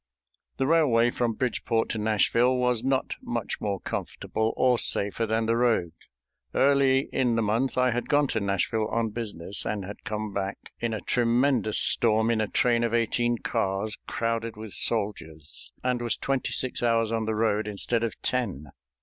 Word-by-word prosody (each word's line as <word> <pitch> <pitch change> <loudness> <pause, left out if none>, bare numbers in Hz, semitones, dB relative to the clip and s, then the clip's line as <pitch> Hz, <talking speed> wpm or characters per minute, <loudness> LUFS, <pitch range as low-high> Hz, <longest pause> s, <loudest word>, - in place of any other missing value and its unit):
The 135 - +1
railway 130 -7 +3
from 120 -2 -1
Bridgeport 115 -1 -1
to 110 - -2
Nashville 115 +4 +2
was 125 -2 +1
not 135 0 0
much 120 -2 -4
more 100 -3 -2
comfortable 110 +4 -3
or 125 -2 +3
safer 100 +3 +2
than 110 +1 0
the 115 +1 +1
road. 115 -8 +2 0.6
Early 135 -1 +3
in 125 -3 +1
the 115 - +1
month 115 +6 0
I 125 0 +3
had 120 +1 -3
gone 145 0 +4
to 110 - 0
Nashville 100 +2 0
on 115 0 -1
business, 105 -4 -2
and 100 -3 -3
had 100 +2 -9
come 105 -1 -4
back 100 +1 -3 0.2
in 115 -2 -1
a - - -5
tremendous 120 -2 +2
storm 110 0 +3
in 110 -2 +1
a 110 - 0
train 120 +2 +2
of 115 0 0
eighteen 120 +1 +1
cars 100 +1 -2
crowded 115 -1 -2
with 110 -2 -8
soldiers, 80 -9 -4
and 125 -1 0
was 120 -2 -1
twenty 135 -1 -1
six 130 - -2
hours 115 -2 +2
on 115 -1 -1
the 110 0 -1
road 110 -1 +1
instead 110 +3 -1
of 115 - -3
ten. 95 - -2
115 Hz, 175 wpm, -26 LUFS, 105-120 Hz, 0.6 s, gone